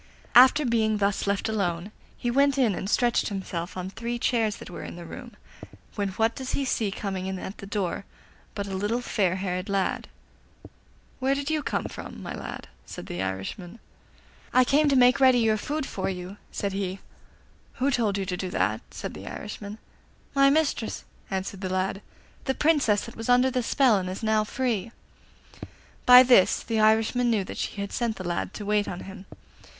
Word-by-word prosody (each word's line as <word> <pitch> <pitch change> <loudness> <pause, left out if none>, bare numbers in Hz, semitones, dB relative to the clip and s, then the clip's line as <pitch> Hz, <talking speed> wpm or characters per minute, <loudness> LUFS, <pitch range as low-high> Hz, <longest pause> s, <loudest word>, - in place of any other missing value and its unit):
After 260 +4 +7
being 220 -3 +2
thus 200 0 0
left 200 0 0
alone, 195 -3 -2 0.3
he 240 - -1
went 280 +2 +3
in 240 -6 +3
and 190 +2 -4
stretched 240 +1 +2
himself 185 -3 -5
on 185 +1 -4
three 235 +3 -4
chairs 225 -3 +1
that - - -10
were - - -7
in - - -7
the 170 0 -9
room, 240 +7 -9 0.6
when 200 -2 -1
what 225 +3 +1
does 260 +1 -5
he 275 - 0
see 225 -4 0
coming 195 -2 -4
in 190 0 -3
at 190 +2 -7
the 195 - -8
door 200 -2 -2 0.5
but 200 - -3
a 195 - -6
little 210 +5 -1
fair 190 -7 0
haired 185 0 -3
lad. 195 -1 -1 1.1
'Where 270 +1 +2
did 280 +2 -2
you 310 -1 +1
come - - -2
from, - - -8
my - - -5
lad?' - - -7 0.2
said - - -9
the 90 - -4
Irishman. 95 - -5 0.8
'I 255 - +6
came 290 +3 +3
to 275 - +3
make 250 0 +5
ready 260 -2 +6
your 225 -2 +3
food 290 +7 -3
for 190 - -3
you,' 185 +1 -6
said 200 -1 -3
he. 195 -1 -2 0.8
'Who 270 +2 0
told 220 -6 +1
you 195 - -2
to 180 -1 -2
do 185 0 -4
that?' - - 0
said - - -6
the - - -9
Irishman. 210 0 -7 0.6
'My 275 0 +5
mistress,' 285 -6 0 0.3
answered 190 0 -4
the 190 - -3
lad 185 +1 -1 0.4
'the 265 - 0
Princess 290 -10 +2
that 230 - -10
was 225 +2 -6
under 250 +1 +5
the 255 0 0
spell 245 -3 +3
and 185 -1 -4
is 185 +5 -6
now 220 -1 +3
free.' 230 -2 -2 1.2
By 250 0 +11
this 245 -7 +5
the 225 -1 -1
Irishman 220 +3 +3
knew 215 -4 +2
that - - -8
she - - -3
had 200 - -4
sent 235 -2 -1
the 185 - -7
lad 175 +2 -3
to 210 - -6
wait 210 0 +1
on 180 - -5
him. 195 0 -10
215 Hz, 195 wpm, -26 LUFS, 190-245 Hz, 1.2 s, By